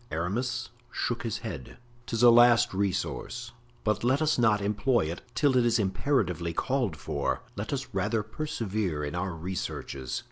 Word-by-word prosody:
'" - - -30
Aramis 120 +9 -2 0.2
shook 120 - -1
his 115 -1 -2
head. 80 - -6 0.3
"'Tis 115 0 0
a 120 - +10
last 120 0 +6
resource, 105 +4 -2 0.3
but 105 0 0
let 130 +3 +3
us 155 -4 +2
not 110 -3 +4
employ 105 +5 +2
it 85 +3 -4
till 140 -3 +3
it 125 - +5
is 120 -1 +3
imperatively 95 - 0
called 125 - 0
for; 70 -2 -2
let - - -4
us - - -3
rather 110 -2 0
persevere 110 - -2
in 75 - -3
our 90 0 -2
researches." 80 -7 -4
110 Hz, 165 wpm, -28 LUFS, 90-120 Hz, 0.3 s, a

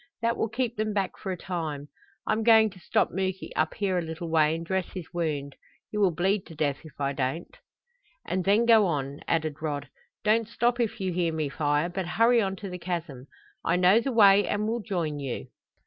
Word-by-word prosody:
That 230 +1 +2
will 225 - -1
keep 240 0 -2
them 215 0 -1
back 195 -2 -1
for 190 - -4
a 185 - -3
time. 160 -5 -4 0.4
I'm 215 +1 +1
going 220 -1 +6
to 185 - -15
stop - - +1
Muky 190 +1 -3
up - - 0
here 190 -3 0
a - - -1
little 165 0 -6
way 155 -1 +3
and 165 0 -5
dress 190 +1 -1
his 185 -3 -6
wound. 150 -5 -2 0.4
He 210 - -4
will 200 -2 +5
bleed 185 +4 0
to 165 - -11
death 145 -2 0
if 155 -3 -14
I 140 0 0
don't." 135 +5 -3 0.7
"And 185 0 -1
then 205 +5 +3
go 225 -4 +6
on," 140 -3 -2
added 155 -2 -1
Rod. 145 -3 -3 0.3
"Don't 220 +1 +2
stop 240 +1 0
if 230 -3 -1
you 190 -2 -1
hear 170 -1 +1
me 155 -2 -2
fire, 145 +2 0
but 180 0 -4
hurry 230 +1 +5
on 195 -2 -1
to 195 +1 -7
the 180 - -6
chasm. 165 -7 -5 0.4
I 170 - +2
know 185 +5 +5
the 270 - -2
way 205 -3 +6
and 210 +1 -1
will 230 +2 -1
join 170 -8 -2
you. 135 -4 -5
180 Hz, 215 wpm, -27 LUFS, 155-210 Hz, 0.7 s, going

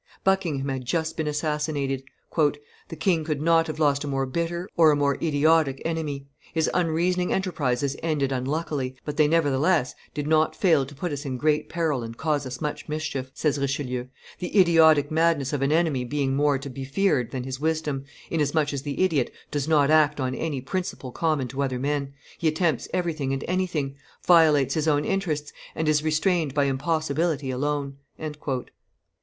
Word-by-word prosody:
Buckingham 175 -8 +1
had 130 -1 -3
just 160 +5 -1
been 160 -2 -2
assassinated. 150 -2 -1 0.3
"The 145 +1 -2
king 165 -1 +2
could 155 -2 -2
not 165 +1 +3
have 155 - -4
lost 145 -2 +2
a - - -4
more 135 -1 0
bitter 170 +6 -2
or 165 -2 +6
a 150 - +4
more 140 -1 +2
idiotic 155 -2 +3
enemy; 155 -4 -3 0.3
his 160 -1 +2
unreasoning 180 +1 +1
enterprises 140 -8 0
ended 150 -4 0
unluckily, 135 0 -2
but 150 - -4
they, 155 -1 +5
nevertheless, 150 -1 +2 0.2
did 145 -1 -2
not 155 0 +2
fail 160 -8 +3
to 145 - -12
put 170 +5 -3
us 145 0 -4
in 130 -3 -3
great 150 +2 +1
peril 160 -6 0
and 115 0 -7
cause 150 -3 0
us 130 0 -6
much 150 0 -4
mischief," 150 -4 -3
says 150 -2 0
Richelieu 130 -3 -2 0.3
"the 180 +3 0
idiotic 160 -5 +5
madness 160 -4 +2
of 145 - -1
an 140 +1 +2
enemy 155 -5 +2
being 135 +1 -1
more 145 0 +3
to 140 +1 -7
be 135 +1 -6
feared 135 - +1
than 130 -2 -4
his 130 0 -5
wisdom, 155 -3 -1 0.3
inasmuch 150 -1 +1
as 140 - -3
the 145 +5 -1
idiot 155 -9 +1 0.2
does 145 -1 -1
not 150 -2 +4
act 150 -1 +4
on 130 -1 -1
any 145 -1 -3
principle 140 -3 -4
common 155 -3 0
to 140 +1 -3
other 130 -2 -1
men, 140 +1 -1 0.3
he 165 - +1
attempts 155 -3 +1
everything 160 -7 -1
and 135 - -3
anything, 170 -7 -1 0.3
violates 155 -6 +5
his 155 -1 0
own 145 -1 +2
interests, 160 -7 -2 0.2
and 160 - -1
is 150 -1 +3
restrained 155 -1 +1
by 145 - +3
impossibility 150 +1 0
alone." 140 +1 -2
150 Hz, 175 wpm, -25 LUFS, 135-160 Hz, 0.3 s, or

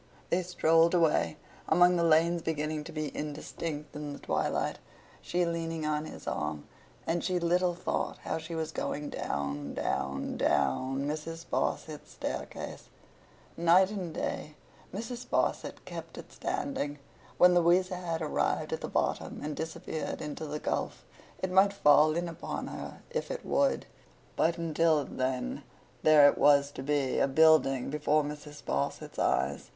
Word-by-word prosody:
They 180 - +3
strolled 165 -1 +3
away, 155 - +2 0.3
among 175 +2 +6
the 170 - +2
lanes 165 +1 +4
beginning 155 -1 -2
to 165 - -8
be 155 -2 -4
indistinct 150 0 -5
in 150 -1 -5
the - - -7
twilight—she 175 0 -2
leaning 165 -1 -2
on 150 0 0
his - - -10
arm—and 75 - -4
she 185 -1 0
little 175 +1 +2
thought - - -2
how - - -2
she 165 +1 -7
was 160 -1 -2
going 145 0 -3
down, 70 0 -3
down, - - -2
down, 135 - +1
Mrs. 165 +2 -4
Sparsit's 155 -2 -2
staircase. - - -5 0.7
Night 175 +3 +5
and 185 -5 -4
day, 150 -1 -4 0.4
Mrs. 235 +5 -5
Sparsit - - -1
kept - - -8
it - - -10
standing. 145 - -3 0.4
When 180 0 +7
Louisa 180 +2 +3
had 165 -2 -3
arrived 150 - 0
at - - -3
the - - -3
bottom - - -1
and 150 0 -3
disappeared 160 0 -4
in 150 -1 -4
the 150 -1 -5
gulf, - - -3 0.4
it 185 - 0
might 195 +2 +5
fall 155 -3 +5
in 175 +1 -1
upon 170 0 -5
her - - -8
if 480 - -2
it - - -5
would; 280 -1 +2 0.5
but, 165 +1 +2
until 160 -2 +2
then, 130 - -2 0.4
there 150 -2 +8
it - - +2
was 140 -1 +5
to 130 - -7
be, 140 -1 0
a - - +4
Building, 135 -3 +4
before 150 0 +2
Mrs. 150 0 -8
Sparsit's 70 +1 -3
eyes. - - 0
160 Hz, 145 wpm, -30 LUFS, 145-170 Hz, 0.7 s, there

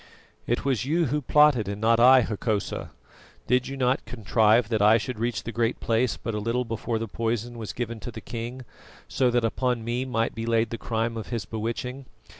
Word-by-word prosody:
"It 120 +4 -1
was 130 -6 +1
you 165 +5 +1
who 150 - 0
plotted, 145 -6 +4
and 100 0 -4
not 115 +1 +3
I, 130 +2 +8
Hokosa. 105 -2 -2 0.6
Did 125 +1 +2
you 135 - -6
not 130 0 +1
contrive 110 0 +2
that 110 -3 0
I 105 +2 +6
should 120 0 -5
reach 120 +1 -1
the 115 - -5
Great 115 0 0
Place 115 +2 +1
but 115 - -5
a 105 - -2
little 115 +4 -1
before 115 +1 -3
the 115 +1 -3
poison 115 +2 -2
was 110 -3 -5
given 115 -2 -4
to 120 - -7
the 110 - -8
king, 120 +3 -6 0.4
so 130 -2 +1
that 120 -1 +1
upon 125 0 -1
me 120 +2 -1
might 115 -3 -1
be 115 0 -5
laid 115 -1 +1
the 115 - -4
crime 115 0 -2
of 110 - -6
his 115 -5 -3
bewitching? 115 +5 -4
115 Hz, 210 wpm, -26 LUFS, 110-125 Hz, 0.6 s, I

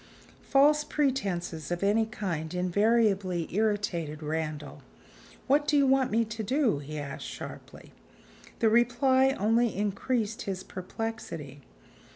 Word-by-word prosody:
False 295 +2 +4
pretenses 195 - -1
of 175 +2 -2
any 215 +2 +3
kind 175 -6 -4
invariably 195 -1 +2
irritated 195 -8 -1
Randal. 155 -1 -4 0.6
"What 290 +2 +2
do 295 - +3
you 280 - +5
want 265 -1 +3
me 230 +1 +2
to 220 +1 -5
do?" 245 - +1
he 150 +2 -7
asked 145 -2 -6
sharply. - - -9 0.7
The 225 - +5
reply 260 +3 +3
only 225 +3 +2
increased 215 +3 -1
his 190 -4 -4
perplexity. 180 -8 -6
210 Hz, 120 wpm, -28 LUFS, 175-240 Hz, 0.7 s, you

